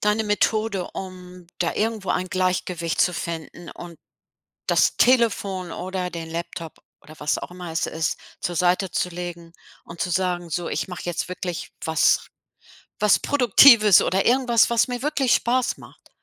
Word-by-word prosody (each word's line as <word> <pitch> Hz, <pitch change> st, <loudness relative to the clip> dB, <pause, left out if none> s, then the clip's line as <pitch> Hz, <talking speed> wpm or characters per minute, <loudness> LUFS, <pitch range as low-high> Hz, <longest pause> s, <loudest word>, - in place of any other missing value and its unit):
deine 210 Hz, +1 st, +2 dB
Methode, 210 Hz, -2 st, 0 dB
um 180 Hz, -1 st, -9 dB
da 170 Hz, -, -1 dB
irgendwo 220 Hz, -2 st, -2 dB
ein 185 Hz, -, -1 dB
Gleichgewicht 180 Hz, -2 st, -1 dB
zu 180 Hz, -, +3 dB
finden 170 Hz, 0 st, -6 dB
und 170 Hz, -2 st, -11 dB, 0.7 s
das -, -, +3 dB
Telefon 200 Hz, -7 st, +2 dB
oder 185 Hz, 0 st, -4 dB
den 165 Hz, -2 st, -7 dB
Laptop 165 Hz, -1 st, -6 dB, 0.3 s
oder 155 Hz, -, -14 dB
was 150 Hz, -, -1 dB
auch -, -, -8 dB
immer 180 Hz, -2 st, -8 dB
es 160 Hz, -, -1 dB
ist 160 Hz, 0 st, -2 dB, 0.2 s
zur 175 Hz, -, -2 dB
Seite 180 Hz, +2 st, +1 dB
zu -, -, -1 dB
legen 175 Hz, -1 st, -8 dB, 0.3 s
und 170 Hz, 0 st, -11 dB
zu 180 Hz, -, -3 dB
sagen: 175 Hz, -1 st, -1 dB
„So 175 Hz, +2 st, -2 dB
ich -, -, -2 dB
mache 180 Hz, -1 st, -8 dB
jetzt 175 Hz, 0 st, -3 dB
wirklich 180 Hz, -2 st, -5 dB
was 160 Hz, -1 st, +2 dB, 0.7 s
was 210 Hz, -1 st, +4 dB
Produktives 235 Hz, -6 st, +6 dB
oder 190 Hz, +2 st, 0 dB
irgendwas, 245 Hz, -2 st, +3 dB
was 235 Hz, +1 st, +2 dB
mir 245 Hz, -1 st, -4 dB
wirklich 280 Hz, -4 st, +1 dB
Spaß 250 Hz, +1 st, +1 dB
macht“? -, -, -17 dB
180 Hz, 160 wpm, -23 LUFS, 170-215 Hz, 0.7 s, Produktives